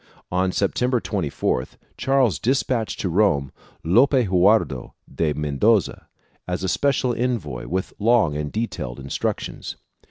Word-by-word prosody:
On 90 Hz, +1 st, +1 dB
September 125 Hz, +7 st, +1 dB
24th, 75 Hz, -, -2 dB, 0.2 s
Charles 135 Hz, -6 st, +2 dB
despatched 125 Hz, -2 st, 0 dB
to -, -, -1 dB
Rome 80 Hz, -8 st, +2 dB, 0.3 s
Lope 120 Hz, -, +4 dB
Hurtado 95 Hz, -, +2 dB, 0.2 s
de 80 Hz, -2 st, 0 dB
Mendoza 75 Hz, +9 st, +1 dB, 0.4 s
as 90 Hz, 0 st, -3 dB
a -, -, 0 dB
special 130 Hz, +4 st, +1 dB
envoy 115 Hz, -, -2 dB
with 95 Hz, +2 st, -3 dB
long 110 Hz, -8 st, +3 dB
and 75 Hz, -1 st, -3 dB
detailed 105 Hz, -, -4 dB
instructions. 70 Hz, 0 st, -4 dB
95 Hz, 120 wpm, -23 LUFS, 75-120 Hz, 0.4 s, Lope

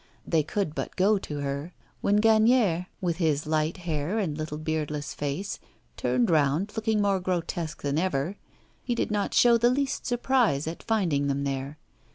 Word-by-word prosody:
They 165 Hz, -2 st, +2 dB
could 155 Hz, +1 st, -2 dB
but -, -, -5 dB
go 200 Hz, +2 st, +3 dB
to 145 Hz, -5 st, -5 dB
her. 140 Hz, +4 st, -4 dB, 0.3 s
When 205 Hz, +1 st, +3 dB
Gagnière, 220 Hz, -5 st, +4 dB
with 175 Hz, -3 st, -1 dB
his 155 Hz, -4 st, +1 dB
light 155 Hz, +2 st, 0 dB
hair 170 Hz, +2 st, -2 dB
and 180 Hz, -9 st, -1 dB
little 155 Hz, 0 st, -4 dB
beardless 150 Hz, -2 st, -3 dB
face, 145 Hz, +7 st, -3 dB, 0.4 s
turned 125 Hz, -, +1 dB
round, 155 Hz, +6 st, +2 dB
looking 220 Hz, -2 st, +1 dB
more 200 Hz, -1 st, +2 dB
grotesque 175 Hz, -2 st, -3 dB
than 145 Hz, +1 st, 0 dB
over, 175 Hz, 0 st, -1 dB, 0.5 s
he 240 Hz, -, -1 dB
did 235 Hz, -, -1 dB
not 205 Hz, -1 st, -1 dB
show 235 Hz, -1 st, +6 dB
the 240 Hz, +1 st, +4 dB
least 270 Hz, +2 st, -1 dB
surprise 245 Hz, -, +2 dB
at 160 Hz, +2 st, -5 dB
finding 170 Hz, -11 st, +1 dB
them 140 Hz, 0 st, -1 dB
there. 135 Hz, +1 st, -3 dB
165 Hz, 170 wpm, -27 LUFS, 145-205 Hz, 0.5 s, show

